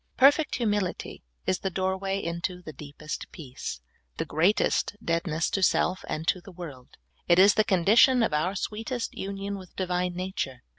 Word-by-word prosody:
Perfect 285 +4 +5
humility 205 -6 -2 0.2
is 185 - +1
the 190 - -2
door 190 +1 0
way 195 0 -2
into 175 0 -3
the 155 - -8
deepest 150 +2 -7
peace, 130 - -7 0.4
the - - -1
greatest 180 +5 +2
deadness 165 -1 0
to 195 - 0
self 185 0 +2
and 160 +1 -3
to 185 - +2
the 195 - -12
world; 150 -8 -10 0.3
it 175 - +5
is 195 +2 +7
the 215 - +3
condition 220 +6 +5
of 220 - 0
our 175 +6 0
sweet 215 +3 -4
est 245 -2 -3
union 195 +1 -4
with 185 -2 -14
Divine 180 -1 -1
nature. 180 -9 -4
185 Hz, 170 wpm, -27 LUFS, 170-200 Hz, 0.4 s, is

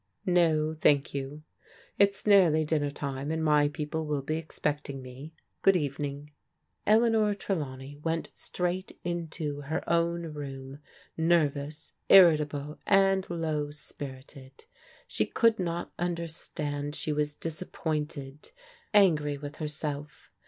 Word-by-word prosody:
"No, 160 -4 +3
thank 145 -3 +3
yotu 140 +2 -5 0.6
It's 200 0 +3
nearly 175 -7 +5
dinner 150 -2 +1
time, 140 0 -4
and 160 0 -1
my 150 -1 +4
people 150 +1 -3
will 145 -2 -1
be 155 +3 -1
expecting 145 -3 -3
me. 130 +4 -10 0.3
Good 195 - +5
evening." 145 -1 -3 0.6
Eleanor 220 -1 +4
Trelawney 145 -8 -4
went 165 +2 -2
straight 180 +1 -3
into 165 -4 -3
her 145 +3 -3
own 170 -1 0
room, 135 -1 -7 0.4
nervous, 155 -2 0 0.2
irritable, 150 -5 +5
and 195 -1 +4
low 155 -3 -1
spirited. 135 - -9 0.4
She - - -1
could 230 -3 +3
not 170 -1 -3
un 175 0 0
derstand 150 -3 -4
she 155 - -2
was 150 0 -1
disappointed, 150 -4 -4 0.5
angry 150 -8 +4
with 145 +1 -8
herself. 150 -1 -5
150 Hz, 115 wpm, -29 LUFS, 145-170 Hz, 0.6 s, nearly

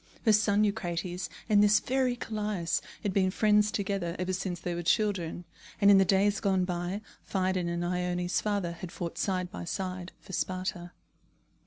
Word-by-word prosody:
Her 220 - +6
son 210 0 +3
Eucrates 180 -4 -2 0.2
and 210 -2 +5
this 210 0 +5
very 255 0 +1
Callias 210 -7 -2 0.2
had 200 - -1
been 190 -1 +3
friends 210 +1 +3
together 195 -4 -2
ever 185 +1 -2
since 185 -2 -3
they 175 0 -3
were 170 - -3
children; 175 -2 0 0.3
and 200 -1 +7
in 195 - +8
the 195 - +5
days 200 +2 +3
gone 190 -2 +2
by, 180 +3 -3 0.2
Phidon 185 -2 0
and 170 0 -2
Ione's 180 0 0
father 200 -5 -1
had 170 +1 -8
fought 170 -2 -5
side 185 -2 -1
by 205 - -6
side 185 0 -4
for 190 - -12
Sparta. 185 -1 -3
185 Hz, 170 wpm, -29 LUFS, 175-205 Hz, 0.3 s, in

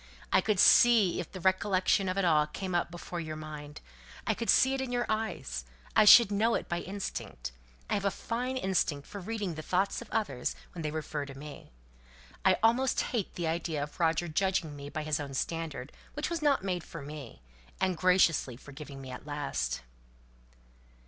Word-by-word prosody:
I - - +6
could 215 -4 0
see 220 -7 +6
if 175 - -5
the 185 - -7
recollection 190 +1 +2
of 185 - -2
it 195 - +2
all 155 -3 +4
came 185 +4 -5
up 175 -1 +1
before 175 0 -6
your 155 -2 -5
mind; 150 -1 -8 0.4
I - - +2
could 230 - -4
see 265 +1 +5
it 270 - -1
in 260 -2 -3
your 245 0 0
eyes; 215 - -2 0.3
I 215 - +7
should 210 0 +9
know 220 +3 +2
it - - -3
by 175 - -1
instinct. 190 - -5 0.4
I - - -2
have 200 -1 0
a - - +4
fine 250 +6 -3
instinct 175 - 0
for 200 - -8
reading 205 -2 -3
the 155 - -6
thoughts 190 +7 0
of 235 - -10
others 205 - -1 0.2
when 170 - -6
they 155 - -2
refer 150 -2 -4
to 135 -1 -9
me. 145 - -10 0.7
I 190 -1 +5
almost 245 +3 +3
hate 220 -6 -2
the 175 - -2
idea 160 -2 -1
of 145 - -9
Roger 165 0 +2
judging 170 -2 0
me 140 0 -8
by 155 +1 -4
his 150 -2 0
own 140 -2 -5
standard, 160 -3 -3 0.2
which 295 +3 -2
wasn't 295 - +2
made 180 -3 -2
for 165 -4 -9
me, 145 - -9 0.4
and 185 -1 +1
graciously 170 -8 +3
forgiving 140 0 -10
me 130 - -8
at 130 +3 -9
last." 70 - -2
175 Hz, 190 wpm, -30 LUFS, 150-205 Hz, 0.7 s, should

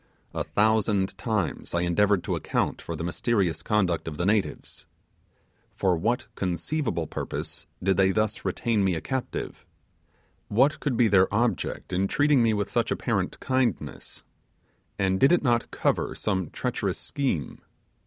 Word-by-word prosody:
A - - -1
thousand 105 -3 +2
times 95 -4 -2
I 85 - +2
endeavoured 100 +2 +2
to - - -1
account - - -1
for 85 - -5
the 80 - -5
mysterious 85 -1 0
conduct 95 -7 0
of 75 -2 -5
the 85 - -1
natives. 105 0 -1 0.9
For 95 -2 +2
what 120 +10 0
conceivable 90 - -2
purpose - - -6 0.2
did 95 0 +2
they 95 -1 +5
thus 110 +3 0
retain 115 -4 0
me 95 -2 +2
a - - -2
captive? 130 -2 -4 0.8
What 135 +8 +3
could 135 -6 -1
be 120 -1 +5
their 95 -2 +4
object 115 -3 -1
in 95 +2 +1
treating 145 +3 +3
me 115 -1 +4
with 105 -2 -1
such - - +1
apparent - - -1
kindness, 130 - -2 0.7
and 95 -1 +1
did 135 - +5
it 175 - +3
not 120 -3 +2
cover - - 0
some 95 -5 -1
treacherous - - -2
scheme? 125 - -2
105 Hz, 150 wpm, -26 LUFS, 90-120 Hz, 0.9 s, they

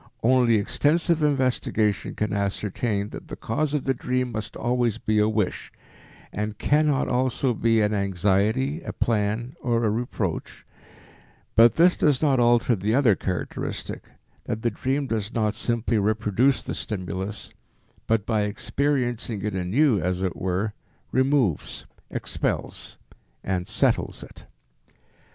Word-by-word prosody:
Only 120 -1 +4
extensive 155 +10 +1
investigation 130 -7 +1
can 105 -1 -1
ascertain 100 +1 -1
that - - -9
the - - -6
cause 145 +6 -1
of 145 - -1
the 135 - +1
dream 125 0 -1
must 110 -2 -5
always 120 -2 0
be 110 -2 0
a 105 +1 +3
wish, 105 -4 -2 0.6
and 105 +1 -3
cannot 150 0 +2
also 130 0 +1
be 115 0 +2
an 105 0 +1
anxiety, 105 - +1
a - - -6
plan 110 +3 -1
or 120 -1 +1
a 110 - +2
reproach; 110 -6 -3 0.9
but 115 +1 +6
this 175 +2 +5
does 145 -4 +2
not 140 -4 +2
alter 120 0 +4
the 105 +3 0
other 130 -6 +5
characteristic, 90 -1 -4 0.4
that 110 0 -4
the 120 - +2
dream 135 +6 -1
does 110 -3 -3
not 110 -2 +1
simply 115 -1 0
reproduce 110 +5 +2
the - - -4
stimulus 95 0 -5 0.5
but 110 -2 +1
by 110 -2 +1
experiencing 120 0 -1
it 105 -1 -2
anew, 105 +7 +2
as 90 +2 -1
it 95 - -1
were, 95 +3 -1 0.4
removes, 130 - +1 0.3
expells - - -3 0.5
and 90 -2 -2
settles - - 0
it. - - -14
115 Hz, 135 wpm, -25 LUFS, 105-130 Hz, 0.9 s, but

